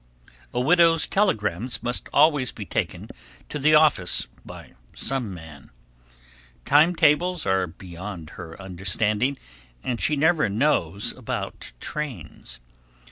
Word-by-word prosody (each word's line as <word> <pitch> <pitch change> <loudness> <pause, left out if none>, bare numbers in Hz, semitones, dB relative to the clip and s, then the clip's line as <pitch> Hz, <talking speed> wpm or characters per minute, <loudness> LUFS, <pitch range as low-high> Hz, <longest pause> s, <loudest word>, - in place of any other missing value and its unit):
A 120 - -2
widow's 165 +4 +4
telegrams 115 - 0
must 120 +1 -3
always 145 -3 +4
be 105 - -8
taken - - -3 0.4
to 150 - -4
the 155 +2 +5
office 145 - +3 0.2
by - - -12 0.2
some 130 -6 -2
man. 80 -6 -11 1.0
Time 155 +5 +5
tables 165 +3 +2
are 95 -1 +1
beyond 85 -1 -9
her 80 -1 -10
understanding 105 +7 0 0.5
and 120 -2 -3
she 150 - +2
never 155 - +3
knows 100 - 0
about - - -6
trains. 105 - -6
120 Hz, 115 wpm, -24 LUFS, 95-150 Hz, 1.0 s, the